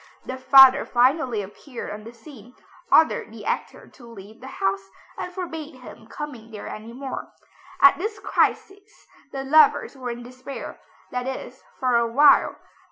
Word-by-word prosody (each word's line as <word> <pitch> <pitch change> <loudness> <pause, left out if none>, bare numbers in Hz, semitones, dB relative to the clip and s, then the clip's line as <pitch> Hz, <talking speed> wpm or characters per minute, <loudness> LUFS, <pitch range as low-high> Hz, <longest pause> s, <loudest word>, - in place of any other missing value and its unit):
The 260 - -5
father 265 +1 +7
finally 245 -3 +1
appeared 235 +6 -9
on 210 +1 -9
the 230 - -9
scene, 245 0 -15 0.4
ordered 315 -8 +3
the 220 -2 -11
actor - - -4
to 245 - -17
leave 215 0 -13
the 260 - -10
house, 195 -5 -3 0.3
and 360 - -6
forbade 325 -5 -7
him 245 -3 -14
coming 245 -5 -8
there 215 -2 -9
any 220 +2 -8
more. 265 +2 -7 0.5
At 370 - +6
this 425 +3 -4
crisis 400 +1 -2 0.3
the 270 -1 -5
lovers 290 +1 +4
were 255 -2 -6
in 240 0 -6
despair, 255 +2 -9 0.3
that 250 0 -3
is 265 - -7 0.2
for 255 -3 +2
a 235 0 +1
while. 290 +5 +5
255 Hz, 160 wpm, -23 LUFS, 230-290 Hz, 0.5 s, father